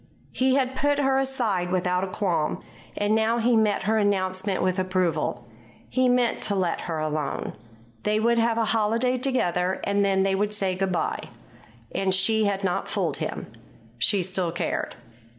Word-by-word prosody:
He 260 0 +2
had 265 -1 0
put 290 +2 +1
her 270 -2 +2
aside 235 -10 -1
without 180 0 0
a - - -1
qualm; 175 -5 -1 0.3
and 205 +1 +1
now 220 +1 +2
he 240 +1 +3
met 215 -3 +2
her 220 +2 +2
announcement 190 -1 0
with 185 0 +1
approval. 175 -9 -1 0.4
He 255 -1 +2
meant 245 -1 +2
to 205 - 0
let 180 -3 0
her 165 - -1
alone. 155 -2 -2 0.5
They 210 +1 +1
would 235 +1 +2
have 230 0 +2
a 230 - +2
holiday 230 +4 +1
together, 185 -9 0
and 200 0 +1
then 195 -1 +2
they 195 0 +1
would 205 +2 0
say 195 -2 0
good 190 +1 -1
bye. 175 - -1 0.7
And 190 -1 +1
she 220 +3 +2
had 200 -1 -1
not 180 -2 -1
fooled - - -1
him. - - -4 0.5
She 195 - +2
still 180 -1 -1
cared. 170 - -3
200 Hz, 170 wpm, -25 LUFS, 185-230 Hz, 0.7 s, he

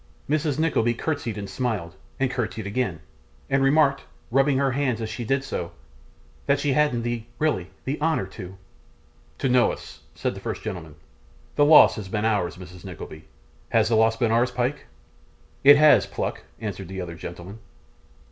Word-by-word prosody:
Mrs. 150 -1 0
Nickleby 135 -7 +1
curtseyed 130 -5 -3
and 100 -1 -5
smiled, 95 -5 -3 0.2
and 135 -1 +1
curtseyed 110 -4 -3
again, 100 -6 -2 0.5
and 135 - +3
remarked, 140 0 +4 0.3
rubbing 135 +2 +3
her 135 0 +2
hands 130 -3 0
as 110 -1 -4
she 120 +2 -5
did 135 +4 0
so, 90 -10 -4 0.7
that 140 0 +3
she 140 -1 +1
hadn't 145 -6 +2
the 120 -1 -2 0.2
really 120 - 0 0.2
the 145 +3 -3
honour 155 -9 +1
to 95 0 -10 0.8
'To 135 - 0
know 125 -1 +4
us,' - - -10 0.2
said - - -2
the - - -8
first - - -5
gentleman. 85 -8 -6 0.6
'The 145 - +5
loss 150 -4 +8
has 100 -3 -6
been 105 +2 -1
ours, 100 -6 0
Mrs 90 -1 -11
Nickleby. 80 +1 -9 0.4
Has 110 -1 +3
the 115 - +3
loss 110 +1 +3
been 115 -1 +1
ours, 120 +2 +3
Pyke?' 125 +3 -2 0.8
'It 145 +1 +9
has, 150 0 +6
Pluck,' - - -4
answered 100 -4 -5
the 95 +1 -6
other 90 -2 -5
gentleman. 85 +5 -9
120 Hz, 170 wpm, -24 LUFS, 95-135 Hz, 0.8 s, It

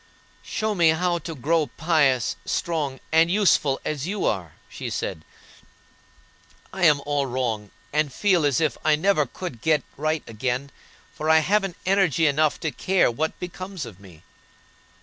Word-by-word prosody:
"Show 215 0 -2
me 170 -4 +4
how 175 +2 +1
to 165 0 -7
grow 150 +3 +1
pious, 145 -7 +1
strong, 150 -6 -2
and 160 +1 +5
useful, 175 -8 +3
as 150 0 -3
you 205 +1 -2
are," 90 -7 -1
she - - -6
said. 80 - -4 1.5
"I 190 -2 +1
am 150 -3 +5
all 145 -1 0
wrong, 120 -5 -2 0.2
and 150 -1 +1
feel 185 +2 +2
as 145 -3 +2
if 155 -2 0
I 155 -1 +4
never 155 -3 +2
could 135 -6 -7
get 155 -4 +2
right 155 +1 -1
again, 125 +5 -3 0.4
for 155 - -3
I 160 - +7
haven't 195 -3 +1
energy 185 -5 +3
enough 150 +1 +2
to 160 - -1
care 185 -6 +2
what 155 +7 -3
becomes 185 -2 -6
of 100 -5 -11
me." 90 -6 -16
155 Hz, 155 wpm, -24 LUFS, 135-175 Hz, 1.5 s, I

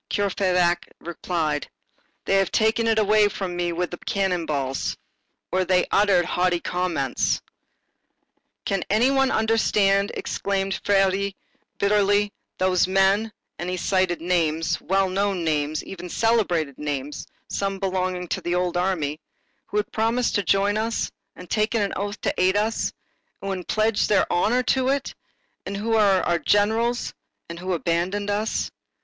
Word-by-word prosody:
Courfeyrac 180 -3 +1
replied: 160 -3 -2 0.6
"They 195 - +3
have 195 -1 +3
finally 220 - +3
taken 230 +1 -1
it 225 -1 +2
away 215 0 +4
from 190 -3 -4
me 175 0 -1
with 175 +1 -2
cannon 185 -4 0
balls." 135 -3 -2 0.5
Or 185 0 +2
they 180 0 +2
uttered 195 -4 +4
haughty 180 -1 +1
comments. 170 -8 -1 1.3
"Can 195 -2 0
any 230 +6 +3
one 270 -1 +3
understand," 210 -3 +2
exclaimed 195 -1 -2
Feuilly 195 0 +2 0.4
bitterly, 205 0 +2 0.2
"those 185 -1 +2
men,—[and 195 -1 0
he 185 - -2
cited 185 -1 0
names, 165 -2 0
well 195 +1 +1
known 195 -1 -1
names, 150 -1 0
even 180 -2 -8
celebrated 175 - +1
names, 145 -1 -4 0.2
some 195 0 -2
belonging 185 -2 -2
to - - -2
the 175 0 -1
old 180 -1 0
army]—who 175 +2 -4
had 210 - -1
promised 230 +2 +1
to 205 - +2
join 200 +3 +2
us, 225 +1 -1 0.2
and 180 - -11
taken 215 +4 +1
an 200 - -2
oath 205 +2 -4
to - - 0
aid 185 +2 +3
us, 220 +2 0 0.5
and 195 - -5
who - - -1
had 180 -2 -8
pledged 215 0 +1
their 205 - +4
honor 240 +8 +2
to 260 0 +1
it, 275 0 -1 0.5
and 200 - -3
who 225 +3 -1
are 200 -4 +4
our 175 -1 +1
generals, 225 +6 +1 0.4
and 170 0 -7
who 185 +1 -2
abandon 180 +5 -1
us!" 210 +2 -1
195 Hz, 145 wpm, -24 LUFS, 175-205 Hz, 1.3 s, away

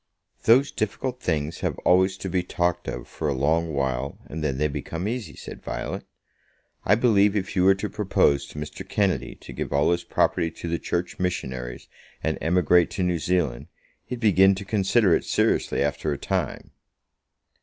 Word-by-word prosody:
"Those 130 +5 +5
difficult 125 +4 -3
things 80 -1 -1
have - - -2
always 95 +1 +4
to 95 - -5
be 90 0 0
talked 90 0 -1
of - - -5
for 80 - -4
a 70 - 0
long 80 +5 +1
while, 70 -1 -2
and 80 0 -6
then 70 -4 -1
they 75 +2 +2
become 80 +5 -4
easy," 115 -1 -4
said - - -9
Violet. - - -4 0.8
"I 105 - +5
believe 105 -3 +4
if 95 -2 -2
you 90 - +3
were 95 0 +6
to 100 +2 -3
propose 95 -9 +1
to - - -12
Mr. 75 0 -6
Kennedy 100 -3 0
to - - -11
give - - -4
all 70 +4 +3
his 85 0 0
property 80 - +1
to 85 - -8
the 85 0 -1
Church 90 0 -3
Missionaries 65 -9 -3 0.4
and 80 -1 -1
emigrate 90 0 +3
to 95 - -2
New 90 -2 +1
Zealand, 75 -7 0 0.4
he'd 125 0 -6
begin 95 -3 +5
to 100 +1 -7
consider 100 -2 +3
it - - -1
seriously - - +1
after 75 +1 -1
a 70 - -2
time." - - -3
90 Hz, 180 wpm, -25 LUFS, 75-100 Hz, 0.8 s, were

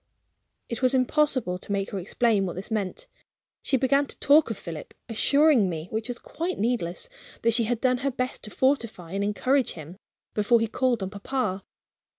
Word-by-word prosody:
It 235 - -4
was 255 0 +3
impossible 255 - +1
to 200 - -8
make 200 0 -1
her 200 - -3
explain 205 +1 +1
what 175 - -5
this 190 +5 -7
meant. 215 - -2 0.6
She 265 - +2
began 275 +2 +2
to - - -5
talk 290 0 +5
of 225 - -3
Philip; 165 -3 -8
assuring 270 -1 +4
me 160 0 -5
(which 220 +1 -2
was 245 -1 -4
quite 340 +8 -4
needless) 210 - -1 0.4
that 230 0 +4
she 230 0 +3
had 235 0 -1
done 255 -1 +2
her 275 +2 0
best 255 -1 -3
to - - -6
fortify 230 - 0
and 200 +1 -1
encourage 255 +6 +1
him, 165 +3 -10 0.4
before 220 +3 +3
he 225 - +1
called 240 -1 0
on 190 - -4
papa. 200 -2 -2
230 Hz, 185 wpm, -26 LUFS, 195-260 Hz, 0.6 s, talk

